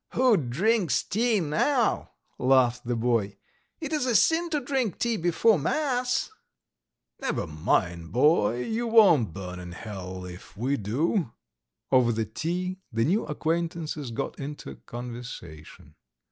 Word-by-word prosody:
"Who 250 -2 +4
drinks 175 - +1
tea 225 +1 +1
now?" 220 - +1 0.3
laughed 125 -2 +3
the 120 - 0
boy. 115 -4 0 0.4
"It 315 -1 -4
is 290 -4 0
a 240 - +1
sin 335 +8 +3
to 305 -2 0
drink 255 - -1
tea 235 -1 0
before 175 +3 +3
mass... 250 - 0 0.4
." - - -60
"Never 270 - -1
mind 85 +2 -1
boy, 125 -3 +3
you 230 - -2
won't 190 - +5
burn 90 0 -7
in 90 -1 -8
hell 95 -2 -7
if 90 +2 -11
we 130 +6 0
do... 140 - -1 0.3
." - - -53
Over 125 -2 +5
the 110 -1 -1
tea 180 - -3
the 115 0 +1
new 195 - +1
acquaintances 160 -2 -2
got 115 - -4
into 140 - -7
conversation. 120 -10 -9
145 Hz, 140 wpm, -27 LUFS, -, 0.4 s, won't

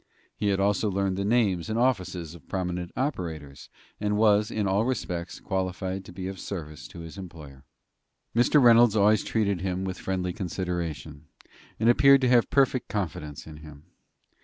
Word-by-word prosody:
He 105 - -2
had 100 -1 +1
also 100 +1 +1
learned 95 -1 -1
the 100 - -2
names 105 -5 +1
and 110 - -1
offices 95 -9 -1
of 85 -5 -16
prominent 90 -2 -3
operators, 80 - -4 0.3
and 105 0 0
was, 105 -1 +4
in 105 -2 -2
all 100 +3 +2
respects, 90 -8 -3
qualified 95 0 -3
to - - -11
be 90 +1 -7
of 95 0 -6
service 75 -6 -7
to 85 - -11
his 85 +4 -9
employer. 75 -7 -11 0.7
Mr. 120 +5 +4
Reynolds 120 -3 +6
always 105 0 +4
treated 100 -5 0
him 95 0 -2
with 95 -1 -4
friendly 90 -1 -2
consideration, 85 -5 -5 0.5
and 110 - +1
appeared 140 +3 +6
to 130 - +2
have 120 -2 +4
perfect 135 -3 +2
confidence 75 -7 -4
in 80 -1 -10
him. 75 -1 -13
95 Hz, 165 wpm, -26 LUFS, 85-110 Hz, 0.7 s, Reynolds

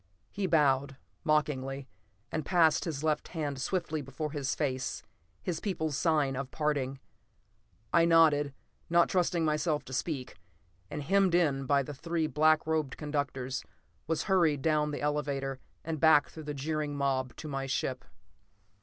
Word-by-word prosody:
He 200 -2 -2
bowed, 140 -4 +2 0.3
mockingly, 140 -3 0 0.4
and 155 - -2
passed 165 -1 +3
his 155 -4 -3
left 155 -1 0
hand 145 -5 -3
swiftly 165 -1 -1
before 140 +3 -5
his 140 -3 -2
face, 130 -4 -2 0.4
his 175 -3 -2
people's 160 -7 -2
sign 150 -4 +2
of 135 0 -4
parting. 140 -3 -1 0.9
I 170 -1 +6
nodded, 155 -4 +5 0.4
not 170 0 +4
trusting 175 -2 +1
myself 150 0 0
to 130 - -9
speak, 130 -1 -3 0.5
and, 150 -1 -4
hemmed 195 +2 +3
in 140 -6 +2
by 140 0 +3
my 145 - -7
three 165 +3 -1
black 155 0 +3
robed 155 -4 -1
conductors, 140 -4 -3 0.4
was 160 0 0
hurried 165 -8 +2
down 150 -2 +2
the 145 - -4
elevator 140 -2 -1 0.3
and 160 -1 -3
back 155 -2 +5
through 160 -2 -10
the 150 -1 -4
jeering 150 +1 -2
mob 130 -2 0
to 155 - -8
my 135 -2 -3
ship. 130 -1 -2
150 Hz, 150 wpm, -30 LUFS, 135-160 Hz, 0.9 s, I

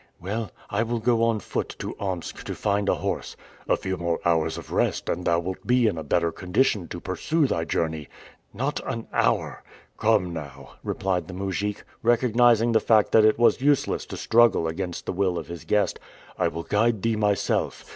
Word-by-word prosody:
"Well, 105 +4 -3 0.2
I 100 - +1
will 115 +1 -1
go 115 0 +2
on 115 -2 +1
foot - - -4
to - - -5
Omsk 95 -4 -4
to - - -4
find 100 -1 0
a - - +3
horse." - - -3 0.3
"A - - +4
few 95 0 -3
more 85 -1 -1
hours 80 -1 +1
of - - -9
rest, - - 0
and 90 +1 -2
thou 85 - +3
wilt 90 +2 -6
be 125 0 +4
in 105 - +2
a 80 - -4
better 85 +3 +1
condition 90 +1 0
to 85 - -6
pursue 150 - 0
thy 85 -10 -1
journey." 80 -3 -2 0.4
"Not 135 +7 -2
an 115 -3 -5
hour!" - - 0 0.4
"Come 100 -5 +2
now," 70 -4 -8
replied 90 -4 -1
the 90 - -8
mujik, 100 +2 -3 0.2
recognizing 120 0 +4
the 110 - +4
fact 110 -2 +3
that 110 - +6
it 110 - +4
was 120 +1 +3
useless 145 0 +1
to - - -7
struggle 115 -7 +4
against 90 +1 -4
the - - -2
will 90 -1 0
of - - -6
his 85 -1 -8
guest, 105 -1 +1 0.4
"I - - +1
will 85 +2 -4
guide 110 +1 +1
thee 115 -1 +2
myself. 105 -2 0
100 Hz, 195 wpm, -25 LUFS, 85-115 Hz, 0.4 s, that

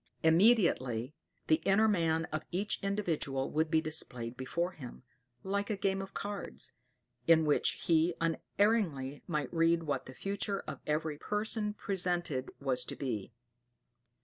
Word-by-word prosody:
Immediately 160 - +4 0.3
'the 155 - +4
inner 205 +3 +4
man' 165 -5 +2
of 155 0 -2
each 200 +4 -1
individual 165 -9 -1
would 155 +1 +1
be 160 0 +3
displayed 125 -7 0
before 170 +8 -2
him, 130 -8 -10 0.4
like 200 +1 -1
a 215 - 0
game 195 0 0
of 195 0 -9
cards, 205 -1 -4 0.6
in 160 -1 +6
which 150 - +1
he 165 +1 +3
unerringly 165 - 0
might 150 -4 -2
read 165 0 +3
what 145 -3 -2
the 130 - -10
future 200 +2 -2
of - - -7
every 150 0 -1
person 210 0 -1
presented 175 -10 -1
was 135 -3 +1
to - - -5
be. 115 -8 -3
165 Hz, 140 wpm, -32 LUFS, 145-195 Hz, 0.6 s, in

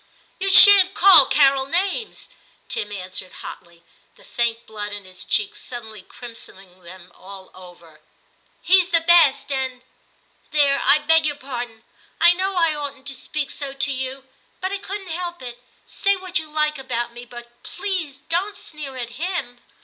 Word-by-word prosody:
*You 390 +1 0
shan't 390 -1 +8
call 365 -8 +8
Carol 275 -2 +3
names,' 385 - -2 0.4
Tim 475 - -4
answered 185 -1 -6
hotly, 170 -1 -12 0.3
the - - -21
faint 235 -1 -2
blood 210 -1 -6
in 205 -1 -8
his 185 +1 -11
cheeks 420 0 0
suddenly 220 - -9
crimsoning 190 -5 -12
them 180 0 -14
all 190 0 -13
over; 175 -4 -16 0.3
* - - -40
he's 370 0 +4
the 335 -2 +2
best 330 -5 +4
and 260 -2 -3 0.7
There, 280 -2 +2
I 280 +3 +6
beg 320 +1 +2
your 290 - -2
pardon; 245 -5 -8 0.4
I 345 - +6
know 380 +2 -2
I 330 -3 +2
oughtn't 280 -2 -7
to - - -5
speak 285 +3 -4
so 280 -2 -6
to 275 +1 0
you, 265 0 -5 0.3
but 375 +2 -4
I 400 - -3
couldn't 390 -1 -7
help 345 +1 -5
it. 245 -1 -9 0.2
Say 400 0 0
what 370 -2 -3
you 315 -1 -10
like 305 -1 -1
about 240 -3 -4
me, 240 0 -10
but 240 0 -14
please 360 -7 -4
don't 370 +5 -1
sneer 285 -4 -9
at 240 -2 -6
him.' 340 -9 -4
275 Hz, 165 wpm, -21 LUFS, 235-345 Hz, 0.7 s, shan't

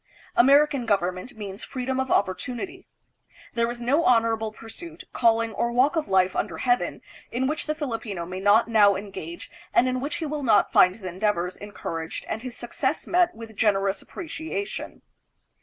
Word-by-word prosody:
American 275 0 +5
government 185 +3 -1
means 200 -1 -6
freedom 260 0 -3
of 265 0 -1
opportunity. 250 - -1 0.7
There 235 0 +1
is 240 0 -5
no 270 +7 +2
honorable 225 -3 +2
pursuit, 325 +10 -9
calling, 230 -1 +2
or 235 +3 0
walk 255 +6 +3
of 320 -2 0
life 185 -1 +3
under 175 -6 -2
heaven 245 +4 0 0.3
in 255 +2 0
which 300 +3 -2
the 305 - 0
Filipino 225 - -4
may 185 +2 -6
not 205 +4 +4
now 210 -3 +5
engage 205 - -7 0.2
and 255 - +5
in 255 0 0
which 285 +3 -2
he 325 - -3
will 300 0 -3
not 220 -6 +4
find 180 0 +6
his 225 - -15
endeavors 185 -1 -1
encouraged 165 -5 -6
and 220 - -3
his 250 -1 -7
success 265 +4 -2
met 355 0 +2
with 225 -1 -10
generous 200 -2 +1
appreciation. 330 +4 -6
230 Hz, 165 wpm, -25 LUFS, 200-270 Hz, 0.7 s, find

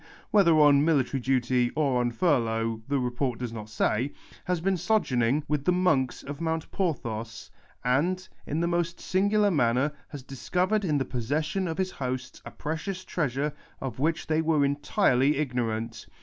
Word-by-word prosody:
whet 200 -4 +5
her 165 - +6
on 145 -1 +6
military 140 -4 +2
duty 125 -1 +2
or 140 -5 +2
on 120 - +1
furlough 115 -5 0
the 140 0 +1
report 125 -1 -1
does 120 -2 -5
not 110 -2 -7
say, 115 +4 0 0.3
has 180 -1 0
been 190 +3 +1
sojourning 150 - +1
witii 150 -1 -2
the - - +4
monks 170 -9 +1
of 145 +2 -7
Mount 160 -1 -2
Porthos, 115 - -3 0.3
and, 175 +9 +1 0.2
in 155 +3 -1
the 170 - +1
most 170 0 -1
singidar 205 +2 +2
manner, 130 +1 +2 0.2
has 145 -4 -9
discovered 180 - -1
in 155 -6 +1
the 135 - 0
possession 155 +9 -1
of 165 -1 -3
his 185 -1 -1
hosts 130 -1 -5
a - - -7
precious 180 +5 -4
treasure 145 -2 -1 0.3
of 130 -1 -5
which 160 +3 0
tluy 160 0 +1
wrre 155 -3 +3
entin 145 -2 +2
ly 140 +3 +3
ignorarit. 115 -5 -2
145 Hz, 170 wpm, -27 LUFS, 125-170 Hz, 0.3 s, her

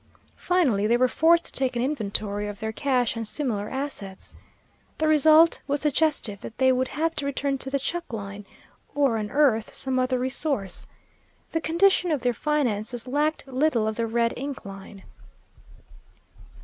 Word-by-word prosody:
Finally 265 - +1
they 235 +2 +3
were 255 +1 +4
forced 335 +5 +3
to - - -5
take 260 -2 0
an 240 - 0
inventory 210 -6 -2
of 205 -1 -7
their 220 0 -3
cash 250 -1 0
and 225 -1 -1
similar 215 -7 -2
assets. 260 -9 -3 0.6
The 310 - +1
result 310 +2 +5
was 285 0 -1
suggestive 295 -9 0
that 225 - -9
they 260 0 +4
would 255 0 +1
have 325 +4 -2
to 285 - -2
return 280 0 -1
to 265 - -5
the 275 - 0
chuck 340 +4 -4
line, 200 -2 -7 0.5
or 275 -6 +2
unearth 220 +1 +1
some 260 -1 -1
other 255 0 +1
resource. 255 - -1 0.6
The 325 - -1
condition 355 +3 +3
of 290 -5 -1
their 245 -1 +2
finances 245 -5 -1
lacked 295 +3 -1
little 260 -3 +1
of 220 - -2
the 230 0 -1
red 230 +1 +1
ink 275 -2 -6
line. 195 0 -10
260 Hz, 160 wpm, -25 LUFS, 220-300 Hz, 0.6 s, result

